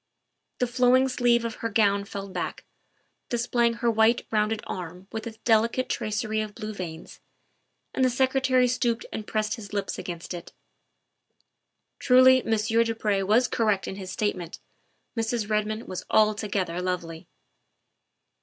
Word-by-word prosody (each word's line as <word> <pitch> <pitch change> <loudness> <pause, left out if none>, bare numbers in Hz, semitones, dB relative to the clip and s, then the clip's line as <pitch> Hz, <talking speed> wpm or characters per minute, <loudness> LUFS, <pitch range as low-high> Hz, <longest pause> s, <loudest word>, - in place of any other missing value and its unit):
The 250 - +1
flowing 255 +2 +3
sleeve 240 -2 +2
of 230 - -4
her 230 - -1
gown 200 -2 +2
fell 200 0 -6
back, 190 - -5 0.6
display 240 0 +1
ing 235 - 0
her 235 0 +1
white, 225 +2 +3
rounded 215 0 0
arm 180 +1 -7
with 220 0 -5
its 220 -1 -8
delicate 230 +3 +2
tracery 215 0 -1
of 210 -1 -6
blue 215 -1 -5
veins, 170 -4 -8 0.7
and 260 - +1
the 255 - +5
Secretary 260 0 +2
stooped 240 -1 0
and 215 - -5
pressed 215 +1 -1
his 205 -3 -10
lips 200 -1 -2
against 175 0 -6
it. 175 - -8 1.5
Truly 255 0 +6
Monsieur 225 +1 +2
du 230 0 -2
Pre 210 -3 0
was 215 +6 +3
correct 215 -5 0
in 190 - -5
his 190 -2 -7
statement 185 -4 -3 0.6
Mrs. 225 -2 -1
Redmond 215 +1 -1
was 185 - -5
altogether 205 -5 +1
lovely. 170 -3 -4
220 Hz, 145 wpm, -26 LUFS, 200-235 Hz, 1.5 s, Truly